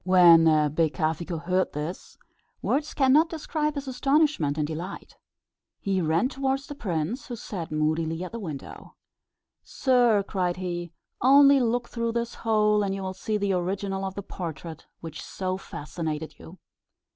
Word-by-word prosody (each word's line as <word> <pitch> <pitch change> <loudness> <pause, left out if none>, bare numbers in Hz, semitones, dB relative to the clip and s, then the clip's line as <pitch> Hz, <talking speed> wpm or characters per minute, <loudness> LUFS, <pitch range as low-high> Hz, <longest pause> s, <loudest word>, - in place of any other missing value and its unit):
When 175 -3 +7 0.3
Becafico 160 +1 0
heard 185 +1 0
this, 150 +5 -6 0.5
words 295 +1 -1
cannot 285 +4 +4
describe 305 -1 -2
his 280 -1 -5
astonishment 270 - +1
and 150 - +1
delight. 165 +5 -6 0.6
He 195 -2 0
ran 165 +7 +2
towards 270 0 -2
the - - -7
prince, 215 - -3
who 245 - -5
sat 190 -8 -6
moodily 160 +2 0
at 185 - -6
the 230 - -5
window. 155 -9 -8 0.7
"Sir," 245 -6 +2
cried 180 -2 -1
he, 175 -2 -4 0.3
"only 275 +2 +7
look 240 0 0
through 230 -1 -2
this 235 0 -2
hole, 210 -2 +2
and 195 -1 -1
you 195 - -5
will 190 0 -3
see 210 +3 -2
the 200 -1 0
original 195 +2 -2
of 190 0 -4
the 200 - -5
portrait 165 -4 -7
which 160 -1 -7
so 185 -1 -3
fascinated 155 -2 -6
you." 175 +4 -12
190 Hz, 150 wpm, -26 LUFS, 165-245 Hz, 0.7 s, When